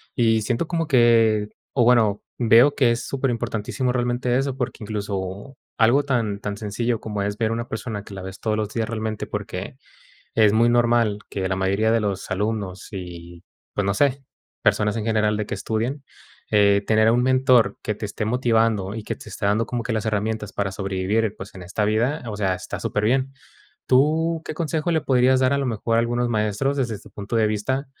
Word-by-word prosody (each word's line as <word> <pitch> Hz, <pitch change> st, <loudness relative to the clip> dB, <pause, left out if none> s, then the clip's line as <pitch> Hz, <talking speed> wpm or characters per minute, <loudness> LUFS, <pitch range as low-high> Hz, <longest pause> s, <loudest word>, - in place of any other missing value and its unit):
Y 115 Hz, -2 st, +3 dB
siento 120 Hz, +8 st, -1 dB
como 165 Hz, -2 st, -1 dB
que, 115 Hz, -4 st, +4 dB, 0.2 s
o 125 Hz, -, +3 dB
bueno, 115 Hz, -4 st, +4 dB, 0.2 s
veo 120 Hz, +4 st, +5 dB
que 125 Hz, -4 st, +3 dB
es 115 Hz, -, -2 dB
súper 135 Hz, -2 st, -1 dB
importantísimo 115 Hz, +2 st, -2 dB
realmente 120 Hz, 0 st, 0 dB
eso, 135 Hz, -1 st, -1 dB
porque 125 Hz, -2 st, -3 dB
incluso 100 Hz, +2 st, -5 dB, 0.2 s
algo 120 Hz, +6 st, +4 dB
tan 115 Hz, -7 st, -1 dB
tan 100 Hz, 0 st, -4 dB
sencillo 110 Hz, +2 st, -2 dB
como 105 Hz, -2 st, -4 dB
es 100 Hz, +1 st, -3 dB
ver 110 Hz, -1 st, 0 dB
una 115 Hz, +1 st, -3 dB
persona, 110 Hz, -2 st, -5 dB
que 105 Hz, -, -12 dB
la 95 Hz, -, -7 dB
ves 95 Hz, +1 st, -8 dB
todos 110 Hz, -1 st, -1 dB
los 105 Hz, -1 st, -2 dB
días 115 Hz, -2 st, -1 dB
realmente, 110 Hz, -1 st, -3 dB
porque -, -, -5 dB, 0.6 s
es 110 Hz, -2 st, +5 dB
muy 115 Hz, +2 st, +4 dB
normal 120 Hz, -3 st, +2 dB
que 95 Hz, -1 st, -2 dB
la 95 Hz, -, -1 dB
mayoría 100 Hz, +4 st, +1 dB
de 115 Hz, -, +3 dB
los 100 Hz, -3 st, -3 dB
alumnos 100 Hz, -1 st, -3 dB
y, 85 Hz, -2 st, -8 dB, 0.3 s
pues, 100 Hz, -, -1 dB
no 100 Hz, -, +1 dB
sé, 140 Hz, +3 st, +1 dB, 0.4 s
personas 105 Hz, +1 st, +2 dB
en 110 Hz, -, -2 dB
general 105 Hz, -1 st, +1 dB
de 105 Hz, -1 st, -2 dB
que -, -, -3 dB
estudian, 120 Hz, +6 st, -2 dB, 0.5 s
eh, 100 Hz, -1 st, +4 dB
tener 110 Hz, 0 st, +4 dB
a -, -, +5 dB
un 120 Hz, +1 st, +2 dB
mentor 130 Hz, -2 st, +3 dB
que 105 Hz, -, -2 dB
te 105 Hz, -, -7 dB
esté 105 Hz, +1 st, -4 dB
motivando 110 Hz, -4 st, +1 dB
y 110 Hz, -, -5 dB
que -, -, -3 dB
te -, -, -12 dB
esté 100 Hz, 0 st, -3 dB
dando 105 Hz, +3 st, +2 dB
como 120 Hz, -1 st, -3 dB
que 115 Hz, -, -3 dB
las 110 Hz, 0 st, -2 dB
herramientas 110 Hz, 0 st, -2 dB
para 100 Hz, -2 st, -2 dB
sobrevivir, 100 Hz, +3 st, -1 dB
pues, 95 Hz, -, -10 dB
en 95 Hz, -, -9 dB
esta 95 Hz, +4 st, -2 dB
vida, 115 Hz, +8 st, +1 dB
o 105 Hz, -, -4 dB
sea, 95 Hz, -3 st, 0 dB
está -, -, -6 dB
superbién. 130 Hz, +6 st, 0 dB, 0.6 s
¿Tú 160 Hz, +5 st, +3 dB
qué -, -, -4 dB
consejo 160 Hz, +1 st, -1 dB
le 160 Hz, -1 st, +2 dB
podrías 130 Hz, -1 st, +3 dB
dar, 130 Hz, +1 st, +3 dB
a 140 Hz, -, +2 dB
lo 140 Hz, -, -1 dB
mejor, 115 Hz, -1 st, -1 dB
a -, -, +5 dB
algunos 120 Hz, +1 st, 0 dB
maestros, 110 Hz, +5 st, 0 dB
desde 115 Hz, -6 st, -1 dB
tu 105 Hz, -, -16 dB
punto 100 Hz, +3 st, -6 dB
de 110 Hz, -1 st, +3 dB
vista, 130 Hz, +7 st, -1 dB
110 Hz, 205 wpm, -23 LUFS, 105-125 Hz, 0.6 s, veo